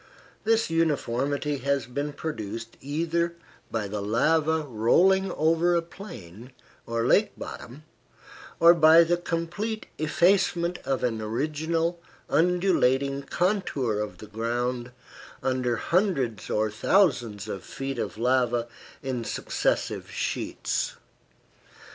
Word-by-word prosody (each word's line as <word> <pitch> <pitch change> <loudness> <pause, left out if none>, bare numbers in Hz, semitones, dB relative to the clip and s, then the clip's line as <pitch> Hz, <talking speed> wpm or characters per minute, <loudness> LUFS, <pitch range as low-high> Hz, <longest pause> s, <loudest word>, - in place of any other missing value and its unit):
This 225 -5 +2
uniformity 145 -2 0
has 140 -1 0
been 145 +4 -3
produced 115 -7 -5
either 170 +4 -1 0.3
by 110 -3 -2
the 105 +1 -4
lava 155 +9 +2
rolling 175 - +3
over 165 +3 +2
a 170 - +1
plain 125 - -11 0.3
or 115 0 -1
lake - - +3
bottom, 140 +6 -8 0.8
or 170 +1 +8
by 165 0 +7
the 170 +1 +2
complete 175 +6 -3
effacement 175 +2 +2
of 135 -1 -1
an 115 -3 0
original, 160 +9 -1 0.3
undulating 140 -6 +2
contour 140 - 0
of 105 -4 -4
the 105 - -10
ground 120 +3 -2 0.5
under 130 -2 0
hundreds 140 - 0
or 110 0 +1
thousands 120 - +2
of 95 - -5
feet 135 0 -5
of - - -3
lava 120 -1 +1 0.4
in 130 -3 -2
successive - - -1
sheets. - - -2
140 Hz, 110 wpm, -26 LUFS, 120-170 Hz, 0.8 s, or